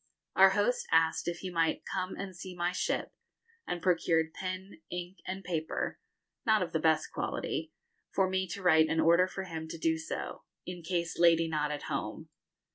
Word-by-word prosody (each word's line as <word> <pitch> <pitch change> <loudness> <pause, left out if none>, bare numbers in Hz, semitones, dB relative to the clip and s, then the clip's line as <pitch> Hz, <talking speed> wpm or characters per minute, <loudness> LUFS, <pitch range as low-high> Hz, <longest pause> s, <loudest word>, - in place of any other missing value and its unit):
Our - - +8
host - - +1
asked 165 +1 +3
if 175 0 -2
he 185 - -4
might 165 -2 +1
'come 185 -1 -3
and 195 -2 -6
see 180 +1 -8
my 175 0 0
ship,' 180 - -1 0.6
and 175 -1 -3
procured 165 -3 +2
pen, 190 - -6
ink, 180 +2 -5
and 190 +1 -4
paper 165 -3 -2 0.4
not 215 -4 +4
of 175 - -5
the 160 - +2
best 160 0 +2
quality - - -2 0.4
for 190 -1 +3
me 190 0 0
to 185 +2 -6
write 160 -3 +6
an 160 - +1
order 170 +3 +5
for 190 +1 -5
him 160 -3 -5
do 160 0 0
so, 160 - -5 0.2
'in 180 -1 -6
case 170 -1 -2
lady 165 -1 +5
not 150 -2 0
at 150 -1 -4
home.' - - -4
175 Hz, 180 wpm, -31 LUFS, 160-185 Hz, 0.6 s, Our